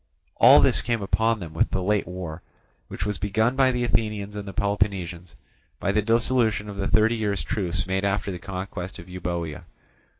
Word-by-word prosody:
All - - +8
this - - +3
came 115 -3 -1
upon 110 +3 +1
them 85 -4 -8
with 80 - +1
the 95 - -2
late 105 +1 +1
war, 90 -3 -6 0.5
which 90 - -5
was 105 -2 -2
begun 110 +5 +1
by 130 -1 +4
the 125 -1 -1
Athenians 105 -3 -1
and 105 -1 -6
Peloponnesians 95 -4 -1 0.4
by 100 - 0
the 105 - +2
dissolution 115 -1 +2
of 100 -1 -7
the 100 0 -1
thirty 110 +2 +3
years' 105 -3 -1
truce 90 -7 -2
made 95 0 -1
after 100 0 0
the 90 - -6
conquest 95 0 -6
of 85 - -11
Euboea. 90 -2 -4
100 Hz, 185 wpm, -25 LUFS, 90-110 Hz, 0.5 s, All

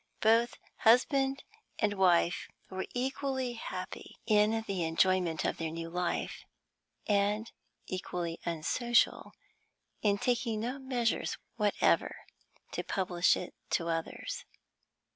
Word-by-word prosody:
Both 230 +2 +4 0.2
husband 270 +4 +4 0.3
and 210 -2 +1
wife 180 -3 +3 0.2
were 190 0 -3
equally 265 0 -1
happy 185 -5 -7
in 215 +1 +3
the 190 -4 -1
enjoyment 170 0 +2
of - - 0
their 165 -1 -2
new 165 +1 -5
life, 180 0 -2 0.6
and 210 +2 +1 0.3
equally 175 -2 -4
unsocial 175 +9 +1 0.7
in 205 -1 +3
taking 230 -1 0
no 250 +4 -3
measures 250 -4 0 0.2
whatever 210 -3 +2 0.6
to - - -2
publish 180 -2 +2
it 180 - -6 0.2
to 170 0 -4
others. 165 0 -3
205 Hz, 105 wpm, -31 LUFS, 175-240 Hz, 0.7 s, Both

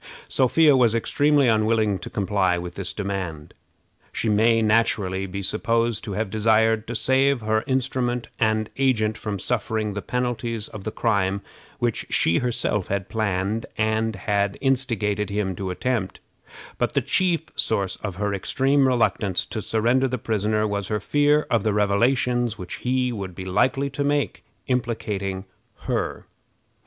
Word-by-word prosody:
Sophia 145 +3 +4
was 120 -3 +4
extremely 145 +4 +2
unwilling 110 -2 +2
to - - -7
comply 95 -4 +1
with 85 0 -6
this 95 -1 -4
demand. 95 -7 -4 0.6
She 115 - -1
may 115 +2 +4
naturally 100 -4 +1
be 100 +2 -5
supposed 115 +2 0
to 100 - -4
have 105 0 -2
desired 110 +1 +2
to 120 - -4
save 135 +2 +2
her 110 0 0
instrument 125 -2 -1
and 110 -1 +1
agent 110 -5 +2
from 105 -2 -4
suffering 110 0 -2
the 105 - -4
penalties 120 -2 -2
of 100 -3 -10
the 110 - -2
crime 100 -4 0 0.4
which 120 -2 -1
she 85 - +3
herself 115 -5 -1
had 100 -1 -2
planned 105 0 -1
and 110 0 0
had 100 0 0
instigated 115 -7 0
him 100 -2 -1
to 95 -1 -3
attempt; 105 0 -2 0.6
but - - 0
the - - +2
chief 180 -4 +1
source 100 -4 0
of 100 -4 -5
her 100 +1 -1
extreme 135 +7 +2
reluctance 110 -6 +1
to 110 - -5
surrender 120 +5 +2
the 130 0 -2
prisoner 110 -1 0
was 100 -2 -2
her 105 - -1
fear 145 +7 +3
of 115 - +3
the 110 0 0
revelations 120 +3 +1
which 90 -3 -7
he 125 0 0
would 95 -6 -6
be 95 - -7
likely 130 +9 +1
to 140 +2 -2
make 145 0 0 0.2
implicating 105 -6 -2 0.4
her. - - -2
110 Hz, 150 wpm, -24 LUFS, 100-125 Hz, 0.6 s, Sophia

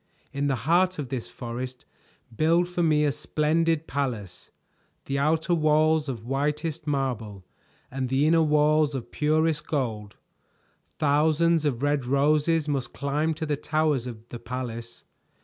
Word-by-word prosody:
In 140 +1 -1
the 135 - +1
heart 180 +3 +3
of 145 -4 -5
this 130 -4 -4
forest 125 +2 -6 0.5
build 165 +6 +3
for 180 0 -2
me 155 -2 +3
a 145 - +2
splendid 160 +2 0
palace, 120 - -4 0.6
the 140 0 -1
outer 160 +4 +1
walls 155 -1 +3
of 115 -4 -5
whitest 150 +4 -2
marble 115 -9 -2 0.5
and 130 -1 -3
the 135 +3 +2
inner 165 +1 +4
walls 150 -1 +3
of 125 - -6
purest 155 0 +1
gold. 110 -8 -3 0.8
Thousands 155 +2 +2
of 135 -3 -1
red 145 -1 +1
roses 150 +4 +2
must 135 -4 -2
climb 150 +3 -1
to 160 +1 -4
the 150 -1 0
towers 150 -4 0
of 115 -1 -9
the 120 - -7
palace. 120 -1 -6
145 Hz, 145 wpm, -26 LUFS, 130-155 Hz, 0.8 s, inner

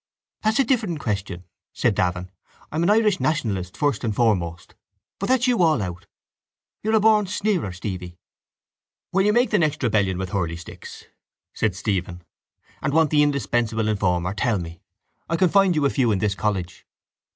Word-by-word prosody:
—That's 215 +1 +1
a 275 - +5
different 220 - 0
question, 100 - -3 0.3
said - - +1
Davin. 90 0 -1 0.4
I'm 155 - -1
an 170 - +2
Irish 210 -2 +3
nationalist, 105 - -1
first 145 -6 0
and 110 -3 -1
foremost. 90 -8 0 0.5
But 200 - -2
that's 255 -1 +3
you 245 -5 +2
all 160 -5 +4
out. 90 -3 -5 0.7
You're 220 +1 +1
a - - +5
born 215 -1 +4
sneerer, 195 - -1
Stevie. 90 -1 -6 0.9
—When 195 +2 +2
you - - +5
make 240 +3 +2
the 210 - +3
next 155 -4 0
rebellion 100 -6 +1
with 95 -1 -4
hurleysticks, 85 -3 -5 0.5
said 105 -4 -1
Stephen, 90 -3 -3 0.6
and 140 - -1
want 160 -2 +3
the 150 -1 +4
indispensable 120 -6 0
informer, 95 -3 0
tell 105 +2 0
me. 85 -2 -7 0.5
I 165 - +1
can 185 +1 +3
find 195 -2 +4
you 150 -2 +1
a 140 - +2
few 125 -5 +2
in 100 - +1
this 100 +1 0
college. 95 -3 -3
115 Hz, 170 wpm, -23 LUFS, -, 0.9 s, a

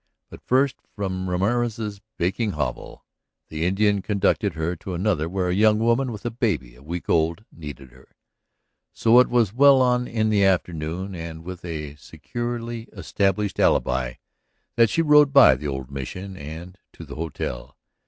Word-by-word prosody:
But - - -11
first, 130 +1 +1 0.2
from 95 -2 -3
Ramorez's 105 +2 -1 0.2
baking 100 +4 -1
hovel, 75 -5 -5 0.4
the 80 +1 -3
Indian 100 +1 +2
conducted 100 -1 0
her 80 +2 -2
to 90 +2 -6
another 85 -4 0
where 90 0 -1
a - - +1
young 105 +2 +4
woman 120 +3 +1
with 105 -1 -9
a 120 - -1
baby 95 - -2
a - - -18
week 85 +4 -6
old 85 +5 +1
needed 70 -5 -10
her. 65 +1 -21 0.8
So 115 +2 +5
it 125 - +4
was 115 -5 +2
well 140 +2 +6
on 125 -1 +2
in 110 -1 0
the 100 -2 +3
afternoon 90 0 -1
and 80 -2 -7
with 90 0 -8
a 75 -4 -5
securely 120 +6 -6
established 100 +2 -1
alibi 65 -1 +2 0.6
that 115 -2 +5
she 165 - +1
rode 150 -2 +6
by 140 - +8
the 70 +4 -5
old 65 -1 -5
Mission 90 +9 -6
and 85 +4 -9
to - - -11
the - - -9
hotel. 75 -6 -5
95 Hz, 165 wpm, -23 LUFS, 80-115 Hz, 0.8 s, by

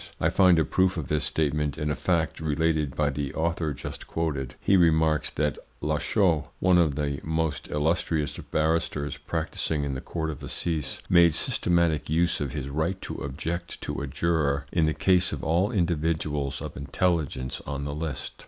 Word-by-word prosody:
I - - +2
find 90 -3 +5
a 80 - +3
proof 95 -1 +2
of 75 -5 -4
this 75 -1 +1
statement 75 -3 0
in 75 0 -1
a - - 0
fact 80 -3 0
related 80 -2 0
by 75 -1 +1
the 70 0 -3
author 80 -1 0
just 65 - -7
quoted. 70 -6 -2
He 100 - +3
remarks 80 -4 +3
that 75 -1 -1 0.2
Lachaud, 85 -8 +1
one 90 -1 +4
of 80 -5 +2
the 70 -1 -1
most 80 -1 -2
illustrious 80 0 0
barristers 80 -2 -1
practising 75 -3 -2
in 70 -1 -2
the 65 - -4
Court 80 -2 -3
of 75 - -9
Assize, 80 -4 -2
made 85 -3 +5
systematic 85 -4 +1
use 85 +2 +2
of 70 -3 -2
his 70 -2 -4
right 80 +6 -1
to - - -5
object 80 +5 -4
to - - -4
a - - -3
juror 75 -4 0
in 80 -2 +2
the 80 - 0
case 90 -2 +3
of - - -5
all 90 +6 +2
individuals 80 - 0
of - - -6
intelligence 70 -2 -1
on 70 0 -3
the 70 - -3
list. 75 -3 -4
80 Hz, 175 wpm, -27 LUFS, 75-85 Hz, 0.2 s, find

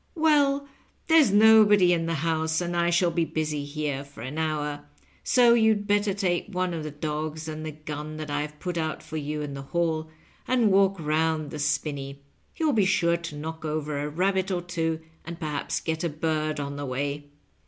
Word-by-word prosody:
"Well, 285 -3 +3 0.4
there's 320 -7 +5
nobody 210 -3 +6
in 165 -1 0
the 165 - 0
house, 160 +1 0
and 175 -1 -2
I 170 0 +2
shall 175 0 +3
be 170 0 +1
busy 155 -2 -2
here 145 -2 -3
for 140 -5 -13
an 130 +6 -5
hour, 150 -2 -2 0.4
so 245 -2 +5
you'd 220 -3 +3
better 205 0 +2
take 185 -2 -1
one 185 -2 -1
of 165 - -3
the 155 - -4
dogs 155 +1 -4
and 155 0 -5
the 155 - -4
gun 150 0 -7
that 155 -1 -5
I've 150 +1 -3
put 180 -2 -3
out 160 -1 -3
for 160 - -6
you 150 0 -3
in 145 -1 -5
the 140 - -6
hall 160 +1 -1 0.4
and 240 -5 +3
walk 195 -1 +3
round 155 -1 0
the 155 - -6
spinney. 140 -1 -2 0.3
You'll 315 -3 +1
be 210 -4 +3
sure 170 -3 +2
to 170 -3 -7
knock 160 +1 -6
over 150 -2 -2
a 145 +1 -2
rabbit 190 +4 0
or 180 -2 -1
two, 165 -2 -2 0.2
and 170 0 -8
perhaps 150 -3 -2
get 160 0 -3
a 170 - +1
bird 155 0 -1
on 140 0 -4
the 145 - -4
way." 145 +2 -3
160 Hz, 195 wpm, -26 LUFS, 150-185 Hz, 0.4 s, nobody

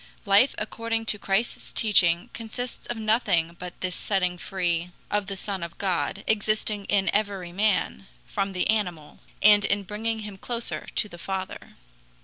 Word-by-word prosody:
Life 205 +7 +5
according 225 +1 -2
to 210 -1 -1
Christ's 195 +4 -1
teaching 175 -6 +3
consists 235 +2 -5
of 240 - -3
nothing 215 -7 +2
but 180 0 -8
this 185 -1 -1
setting 180 -3 0
free 175 -2 -1 0.2
of 205 -1 +1
the 195 0 -4
Son 195 -1 -3
of 170 0 -6
God, 195 +1 -1
existing 215 -1 +1
in 195 -2 +2
every 200 -4 0
man, 200 0 +1 0.2
from 195 -1 -2
the 180 - +1
animal, 180 -8 -1 0.2
and 205 0 +8
in 200 0 +1
bringing 220 +3 -2
him 205 -2 -8
closer 235 +2 -2
to 210 - +2
the 175 -4 -11
Father. 190 +1 -5
200 Hz, 155 wpm, -26 LUFS, 185-215 Hz, 0.2 s, and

